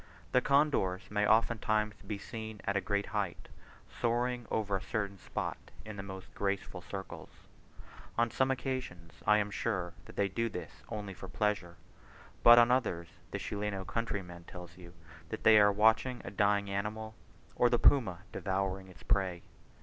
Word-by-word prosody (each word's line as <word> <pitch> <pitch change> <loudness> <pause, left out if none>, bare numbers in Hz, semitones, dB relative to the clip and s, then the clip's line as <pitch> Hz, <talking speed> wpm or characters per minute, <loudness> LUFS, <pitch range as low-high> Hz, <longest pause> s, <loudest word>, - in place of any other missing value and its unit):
The 125 - +4
condors 135 -10 +2
may 105 0 +2
oftentimes 110 -1 +2
be 105 - -2
seen 110 0 -7
at 100 - -1
a 100 - +2
great 100 +1 0
height, 100 -4 -3 0.5
soaring 120 0 0
over 105 -3 0
a 95 - -1
certain 100 -3 -3
spot - - -4 0.3
in 110 -1 -7
the 100 - -5
most 95 -1 -9
graceful 100 -2 -2
circles. 95 +2 -7 0.9
On 115 0 +2
some 130 +3 +2
occasions 125 - -4
I 105 +1 +7
am 105 -1 0
sure 95 -5 -2
that - - -13
they 100 - +2
do 115 +4 -1
this - - -8
only 105 -3 -5
for 95 +1 -9
pleasure, 95 -2 -1 0.7
but 120 0 +10
on 120 0 +7
others, 95 -10 0 0.2
the - - -3
Chileno 100 -2 -3
countryman 95 -7 -4
tells 90 -2 -10
you 85 -1 -13 0.3
that - - -5
they 110 -1 +8
are 105 0 +6
watching 110 +5 +3
a - - -5
dying 100 0 +2
animal, 105 +2 -3 0.4
or 120 - +4
the 120 - +3
puma 105 -10 +4
devouring 95 0 -2
its 90 -5 -15
prey. 90 -3 0
105 Hz, 165 wpm, -32 LUFS, 95-115 Hz, 0.9 s, but